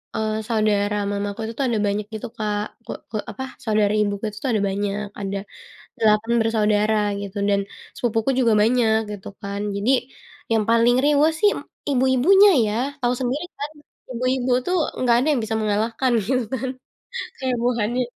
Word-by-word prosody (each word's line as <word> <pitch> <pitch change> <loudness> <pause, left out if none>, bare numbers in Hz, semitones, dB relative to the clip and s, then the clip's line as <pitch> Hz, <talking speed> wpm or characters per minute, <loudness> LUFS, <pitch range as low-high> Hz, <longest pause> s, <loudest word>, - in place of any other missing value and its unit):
eee, 220 0 -1 0.2
saudara 210 -2 +1 0.2
mamaku 205 +1 -3
itu 225 - -5
tuh 275 - +2
ada 225 -2 0
banyak 205 +1 -1
gitu 220 +3 -5
Kak 210 -1 -1 0.2
ke - - -6 0.2
ke 215 - -2
apa 265 - -6 0.2
saudari 210 -2 +2
ibuku 200 0 -3
itu 210 - -13
tuh 265 - 0
ada 215 - +1
banyak 205 +1 -2 0.2
ada, 195 0 -3 0.6
8 220 +1 +3
bersaudara 215 -1 +2 0.3
gitu 200 +1 -7
dan 200 - +3 0.4
sepupuku 225 0 0
juga 235 -3 +4
banyak 225 0 +3 0.2
gitu 205 -2 -8
kan 200 -1 -4
jadi, 205 +6 +1 0.6
yang 220 -2 +3
paling 230 +1 +4
riweuh 295 +2 +4
sih 415 - +5
em - - -6 0.3
ibu-ibunya 265 +11 +5 0.2
ya 210 - -1 0.3
tahu 245 0 +2
sendiri 265 +6 -1
kan, 290 +1 -4 0.4
ibu-ibu 255 +1 0
tuh 365 - 0 0.3
nggak 245 -2 +4
ada 255 +5 +1
yang 260 -6 +1
bisa 220 0 -2
mengalahkan 225 +4 0 0.2
gitu 255 -1 +1
kan 260 0 -2 0.7
kayak 260 -2 -1
Bu - - +3
Hani. 240 +4 0
225 Hz, 170 wpm, -22 LUFS, 210-255 Hz, 0.7 s, sih